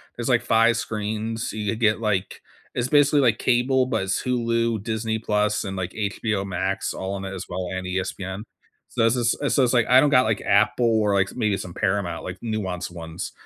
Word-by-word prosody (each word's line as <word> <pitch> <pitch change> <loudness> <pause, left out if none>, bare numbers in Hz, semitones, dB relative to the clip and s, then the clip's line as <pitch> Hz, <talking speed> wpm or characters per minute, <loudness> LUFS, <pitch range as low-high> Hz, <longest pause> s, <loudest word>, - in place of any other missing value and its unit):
there's, 120 +1 -3
like, 120 -2 +3
5 115 0 +4
screens, 110 +1 -3
so - - -9
you 105 -1 -2
could 115 - -4
get, 110 -2 +3
like 105 -4 -2 0.3
it's 120 0 -1
basically, 145 0 +4
like, 115 -4 +3
cable, 130 +1 +2
but 110 - -1
it's 95 0 -1
Hulu, 115 -3 0
Disney 110 0 -2
Plus, 105 -1 0
and, 95 -1 -5
like, 90 0 -3
HBO 105 -1 -2
Max 95 +1 -2
all 95 +1 -4
in 95 - -6
it 95 - -5
as 95 -1 -6
well 90 0 -3
and 95 0 -4
ESPN. 95 +1 -4 0.5
So, 115 - 0
this 115 +2 +3
is 120 -2 +1
and 145 - -1
so 135 - +3
it's 120 - +2
like, 120 -3 +3
I 130 +1 +7
don't 145 - +4
got, 125 -4 +5
like, 110 -1 0
Apple 110 +2 +3
or, 105 -1 +2
like, 95 0 +3
s - - -11
maybe 105 -5 0
some 90 - -7
Paramount, 95 -4 -1
like, 90 - -6
nuance 95 -6 -3
ones, 80 -2 -7
110 Hz, 225 wpm, -24 LUFS, 95-120 Hz, 0.5 s, I